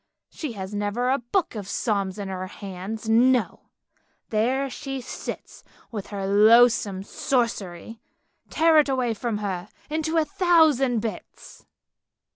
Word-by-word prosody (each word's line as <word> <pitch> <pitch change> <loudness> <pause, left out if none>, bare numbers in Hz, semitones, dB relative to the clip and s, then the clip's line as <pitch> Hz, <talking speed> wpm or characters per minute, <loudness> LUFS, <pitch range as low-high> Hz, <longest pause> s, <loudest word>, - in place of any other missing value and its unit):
She 300 -7 -5
has 195 -1 -7
never 205 +5 -1
a 275 - +1
book 325 - -1
of 205 -4 -6
psalms 200 -2 -1
in 200 -1 -5
her 185 -1 -4
hands, 200 +3 -7
no, 240 +2 +2 0.6
there 250 +6 +1
she 270 0 -5
sits 255 - -8 0.3
with 210 -4 -5
her 200 -2 -4
loathsome 210 -1 +5
sorcery. 225 -4 -2 0.5
Tear 325 -1 +4
it 290 - +2
away 255 -3 0
from 225 0 -3
her, 180 -3 -4 0.2
into 320 +1 -1
a 320 - +3
thousand 305 - +3
bits! 225 -1 -8
230 Hz, 130 wpm, -24 LUFS, 200-265 Hz, 0.6 s, loathsome